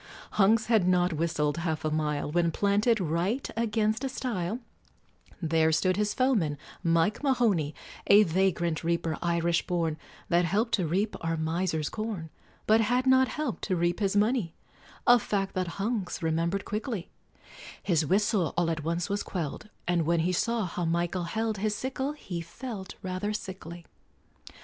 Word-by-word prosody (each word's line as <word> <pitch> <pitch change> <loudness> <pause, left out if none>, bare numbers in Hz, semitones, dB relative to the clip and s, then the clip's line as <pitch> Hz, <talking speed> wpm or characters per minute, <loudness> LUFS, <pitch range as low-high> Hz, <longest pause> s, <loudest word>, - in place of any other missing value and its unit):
Hunks 215 +2 +4
had 220 -6 +3
not 180 -1 +3
whistled 155 -1 0
half 160 -2 -2
a 155 - 0
mile, 150 -1 -1
When, 170 +1 +2
planted 205 +6 +2
right 180 - 0
against 220 +1 0
a 270 - -1
stile, 220 -6 -2 0.9
There 160 0 +3
stood 185 +4 +2
his 210 0 0
foeman, 215 - +2 0.3
Mike 165 +4 +2
Mahoney, 225 - +1 0.3
A 205 +1 +8
vagrant 175 -3 0
reaper, 165 -1 -1
Irish 170 0 +1
born, 165 -3 -1 0.3
That 170 +1 +3
helped 210 +7 +1
to 180 -5 +2
reap 195 +7 0
our 165 0 -1
miser's 160 -1 -1
corn, 210 -8 -4 0.3
But 220 +1 +5
had 245 +4 +1
not 260 0 +5
helped 300 -5 -3
to 190 - 0
reap 175 +1 0
his 200 -1 0
money, 210 -5 +1 0.5
A 245 0 +7
fact 195 -2 -1
that 185 -1 -3
Hunks 200 -4 -2
remembered 165 +4 0
quickly; 215 -3 -4 0.7
His 165 -5 +2
whistle 195 +1 +1
all 170 -1 +2
at 155 -2 -3
once 170 +2 -1
was 200 0 -1
quelled, 175 +3 -4 0.2
And 170 -3 +1
when 170 -1 +3
he 180 +3 +1
saw 230 +3 0
how 175 0 -3
Michael 170 +2 0
held 220 +3 -2
His 210 +1 0
sickle, 265 +4 -3
he 185 - -6
felt 195 +3 -7
rather 185 +3 -2
sickly. 175 -4 -7
185 Hz, 160 wpm, -28 LUFS, 165-215 Hz, 0.9 s, A